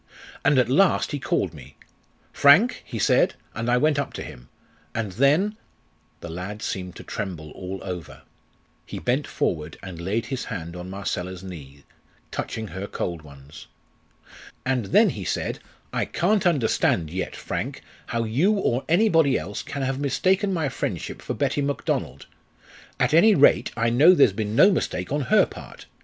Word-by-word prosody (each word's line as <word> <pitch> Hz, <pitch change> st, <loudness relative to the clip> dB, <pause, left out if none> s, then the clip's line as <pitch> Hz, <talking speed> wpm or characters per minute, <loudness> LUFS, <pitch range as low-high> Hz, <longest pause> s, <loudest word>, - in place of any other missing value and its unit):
And 145 Hz, -1 st, +4 dB
at 125 Hz, -, +4 dB
last 175 Hz, +9 st, +3 dB
he 145 Hz, -, -3 dB
called -, -, -1 dB
me. -, -, -13 dB, 0.6 s
'Frank!' 170 Hz, -, +5 dB
he 115 Hz, -, -7 dB
said; 100 Hz, -, +3 dB, 0.2 s
and 115 Hz, +2 st, -3 dB
I 125 Hz, -, +4 dB
went 150 Hz, +2 st, +2 dB
up 140 Hz, -, -3 dB
to -, -, -5 dB
him. -, -, -11 dB, 0.5 s
And 110 Hz, -3 st, -2 dB
then 150 Hz, -, +2 dB, 0.3 s
" -, -, -39 dB
The -, -, -7 dB
lad 95 Hz, +6 st, -6 dB
seemed 90 Hz, -2 st, -4 dB
to -, -, -10 dB
tremble 85 Hz, -6 st, -5 dB
all 95 Hz, +1 st, -6 dB
over. 90 Hz, -4 st, -7 dB, 0.6 s
He -, -, -8 dB
bent 130 Hz, +4 st, -1 dB
forward 80 Hz, -1 st, -2 dB
and 90 Hz, -3 st, -8 dB
laid 105 Hz, +6 st, -1 dB
his 130 Hz, +1 st, -4 dB
hand 85 Hz, 0 st, -6 dB
on 90 Hz, +1 st, -7 dB
Marcella's 95 Hz, -2 st, -4 dB
knee, 70 Hz, -7 st, -10 dB, 0.5 s
touching 110 Hz, -2 st, -4 dB
her 95 Hz, +4 st, -6 dB
cold 85 Hz, -5 st, -4 dB
ones. 70 Hz, -1 st, -13 dB, 1.0 s
"And 130 Hz, -4 st, 0 dB
then -, -, +5 dB
he -, -, -6 dB
said, -, -, -2 dB, 0.3 s
'I -, -, 0 dB
can't 195 Hz, +2 st, +1 dB
understand 110 Hz, -, +1 dB
yet, 95 Hz, +2 st, -4 dB
Frank, -, -, -5 dB, 0.2 s
how 115 Hz, 0 st, -1 dB
you 140 Hz, -, +2 dB
or 135 Hz, -, 0 dB
anybody 165 Hz, -, +4 dB
else 100 Hz, +2 st, -5 dB
can 140 Hz, -2 st, -5 dB
have 135 Hz, 0 st, -1 dB
mistaken 185 Hz, +9 st, +1 dB
my 165 Hz, -5 st, 0 dB
friendship -, -, -4 dB
for -, -, -4 dB
Betty 145 Hz, -, 0 dB
Macdonald. 130 Hz, -, -2 dB, 0.7 s
At -, -, +2 dB
any 210 Hz, +6 st, +6 dB
rate, 145 Hz, -, +5 dB
I 115 Hz, 0 st, +2 dB
know 155 Hz, +10 st, +7 dB
there's 135 Hz, -, +5 dB
been 105 Hz, +1 st, -3 dB
no 190 Hz, -, +7 dB
mistake 90 Hz, -, -2 dB
on 145 Hz, +1 st, 0 dB
her 215 Hz, 0 st, +6 dB
part. -, -, -12 dB
115 Hz, 170 wpm, -24 LUFS, 90-145 Hz, 1.0 s, know